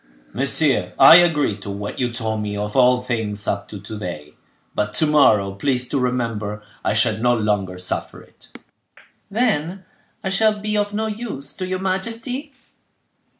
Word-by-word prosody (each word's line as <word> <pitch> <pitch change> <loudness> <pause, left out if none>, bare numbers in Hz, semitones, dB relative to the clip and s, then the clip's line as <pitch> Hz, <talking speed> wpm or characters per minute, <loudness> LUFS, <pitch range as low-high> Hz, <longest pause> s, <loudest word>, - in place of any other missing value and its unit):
"Monsieur, - - +1
I 165 - +10
agree 160 - +3
to 100 0 -9
what 100 +1 -5
you 125 -2 0
told 110 -2 -2
me 105 -1 -3
of 105 0 -4
all 125 -1 +4
things 110 -5 -2
up 100 0 -2
to 105 - -8
to 105 +1 -8
day; 75 -6 -7 0.4
but 105 0 -2
to 155 - +3
morrow, 110 -10 +4
please 125 +4 -1
to 140 - 0
remember, 115 -4 -2 0.2
I - - 0
shall 110 0 +3
no 120 +1 +3
longer 105 -4 -1
suffer 90 0 -3
it." - - -18 0.8
"Then 195 -5 -1 0.4
I 190 - -1
shall 215 +2 +2
be 210 +1 -2
of 205 0 0
no 215 +2 -2
use 210 - -6
to 185 - -5
your 185 0 -2
majesty?" 230 +9 -3
125 Hz, 165 wpm, -21 LUFS, -, 0.8 s, I